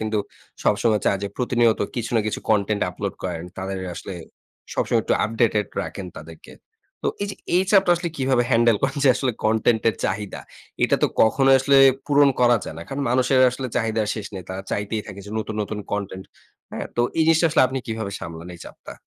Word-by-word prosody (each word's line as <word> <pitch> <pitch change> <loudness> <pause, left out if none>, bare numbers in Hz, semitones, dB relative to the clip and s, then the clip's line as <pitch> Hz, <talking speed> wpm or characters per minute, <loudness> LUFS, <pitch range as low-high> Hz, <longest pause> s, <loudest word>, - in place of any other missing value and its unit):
কিন্তু 110 -1 -1 0.4
সবসময় 105 0 +2
চায় 100 - +2
যে 100 - -2
প্রতিনিয়ত 120 -2 +2 0.2
কিছু 115 -1 -3
না - - +4
কিছু 110 - -3
কনটেন্ট 105 -1 +1
আপলোড 100 +2 -4
করেন। 85 -2 -4
তাদের 95 0 -4 0.2
আসলে 95 - -7 0.6
সবসময় - - +1
একটু - - +1
আপডেটেড 110 -2 +1 0.2
রাখেন 95 - -6
তাদেরকে। 80 +1 -12 0.5
তো - - +1
এইযে 200 -1 -3 0.2
এই 185 - +4
চাপটা 195 -3 +5
আসলে 175 0 -3
কিভাবে 130 -2 +2
হ্যান্ডেল 115 -2 +4
করেন 135 +1 0
যে - - +6
আসলে 130 -2 0
কনটেন্ট 110 +1 +2
এর 110 - -1
চাহিদা? 100 +1 -3 0.4
এটা - - +2
তো - - +6 0.2
কখনোই 135 +4 +4
আসলে 140 +1 +3 0.3
পূরণ 145 -1 +5
করা 120 -1 +5
যায় - - -7
না। - - -6
কারণ 140 +1 -3
মানুষের 130 +1 +3
আসলে 130 +1 -5
চাহিদা 110 -2 0
শেষ 110 -2 -5
নেই। 95 - -6
তারা 95 +1 -5
চাইতেই 105 +1 -2
থাকে 100 - -9
যে 105 - -9
নতুন, 110 0 -4
নতুন 105 +1 -5
কনটেন্ট। 95 -2 -4 0.5
হ্যাঁ? - - -5
তো - - +2 0.2
এই - - +5
জিনিসটা 165 +1 +4
আসলে 155 - +4
আপনি 130 +1 -3
কিভাবে 110 -3 -4
সামলান 85 +1 -8
এই - - -20
চাপটা? - - -11
110 Hz, 195 wpm, -23 LUFS, 100-130 Hz, 0.6 s, যে